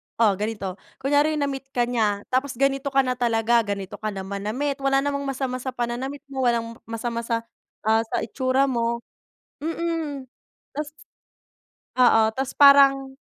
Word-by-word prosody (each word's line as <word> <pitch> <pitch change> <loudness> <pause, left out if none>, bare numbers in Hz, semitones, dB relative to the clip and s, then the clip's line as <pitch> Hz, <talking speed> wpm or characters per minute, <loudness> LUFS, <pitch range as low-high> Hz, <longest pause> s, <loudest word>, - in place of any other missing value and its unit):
oh, 225 -3 +4
ganito 205 -3 -4 0.2
kunyari 290 +3 +2
na-meet 275 -2 -2
ka 240 - +3
niya 215 -4 0
tapos 260 0 0
ganito 275 +1 +1
ka 270 -1 +3
na 255 - -1
talaga, 235 0 +3
ganito 200 0 -4
ka 215 - -3
na 190 - -4
manamit 215 +9 -3
wala 275 0 +2
namang 280 -1 -2
masama 260 -1 -2
sa 260 0 -5
pananamit 255 +4 -3
mo 260 -2 0
walang 230 -1 -1
masama 230 +1 -3
sa, 230 0 -2 0.4
ah, 220 +1 +3
sa - - -2
itsura 260 +3 +1
mo, 235 -3 0 0.6
mm. 325 -5 -3 0.5
Ta's 300 0 -3 1.1
Oo 225 -3 +5
ta's 265 0 -2
parang, 275 -1 +6
255 Hz, 150 wpm, -24 LUFS, 230-275 Hz, 1.1 s, parang